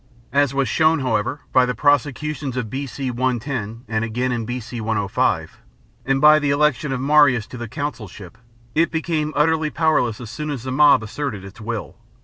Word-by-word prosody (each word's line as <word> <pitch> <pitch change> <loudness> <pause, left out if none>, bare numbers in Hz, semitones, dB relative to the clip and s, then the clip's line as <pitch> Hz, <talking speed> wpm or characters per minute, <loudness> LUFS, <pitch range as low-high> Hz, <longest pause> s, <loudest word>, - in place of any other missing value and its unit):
As 140 -2 +3
was 135 -1 0
shown, 160 +5 +2
however, 125 +2 -1
by 130 - +6
the 125 - -2
prosecutions 145 0 0
of 115 -4 -3
B.C. 135 -1 -4
no, 125 +2 0 0.6
and 110 0 -1
again 120 +3 -1
in 120 -2 -2
B.C. 120 0 -5
105, 105 -3 -1 0.5
and 135 0 +2
by 150 +1 +7
the 145 -2 -1
election 145 0 +1
of 130 - -2
Marius 135 -4 +4
to 125 - -10
the 120 - -5
consulship, 110 - -6 0.3
it 165 +2 +2
became 160 -2 -1
utterly 155 +1 +2
powerless 150 -9 +1
as 115 -3 -8
soon 150 +2 -5
as 135 -5 -4
the 130 - -4
mob 140 -3 +5
asserted 105 -3 -5
its 100 +4 -12
will. 115 0 -5
135 Hz, 175 wpm, -21 LUFS, 115-150 Hz, 0.6 s, by